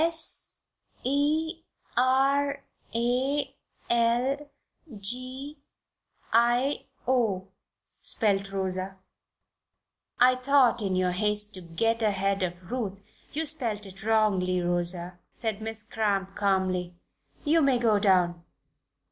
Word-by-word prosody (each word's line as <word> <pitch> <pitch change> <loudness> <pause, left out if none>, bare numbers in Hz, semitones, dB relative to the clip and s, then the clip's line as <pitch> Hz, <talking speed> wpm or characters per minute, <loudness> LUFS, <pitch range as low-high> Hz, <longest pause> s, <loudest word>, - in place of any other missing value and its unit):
"'S 330 0 +1 0.5
e 300 +5 0 0.3
r 275 +2 +2 0.3
a 265 +4 0 0.4
l 245 +5 +1 0.5
g 255 +7 -3 0.8
i 240 +4 +3 0.2
o'," 220 -8 +1 0.5
spelled 200 -3 +1
Rosa. 190 0 -3 1.2
"I 255 +1 +6
thought 255 -3 +4
in 195 -2 0
your 185 0 +2
haste 210 +2 +1
to 185 - -7
get 225 +8 0
ahead 195 -2 +1
of 175 -1 -4
Ruth 215 -6 -2 0.3
you 315 +2 -2
spelled 235 -9 -1
it 195 +1 -12
wrongly, 205 -5 +2
Rosa," 175 0 -1
said 220 -2 -3
Miss 220 0 -5
Cramp, 200 -3 -1
calmly. 185 -3 0 0.5
"You 320 +2 +4
may 275 -3 +4
go 225 -4 +3
down. 180 -4 +2
220 Hz, 105 wpm, -27 LUFS, 190-260 Hz, 1.2 s, I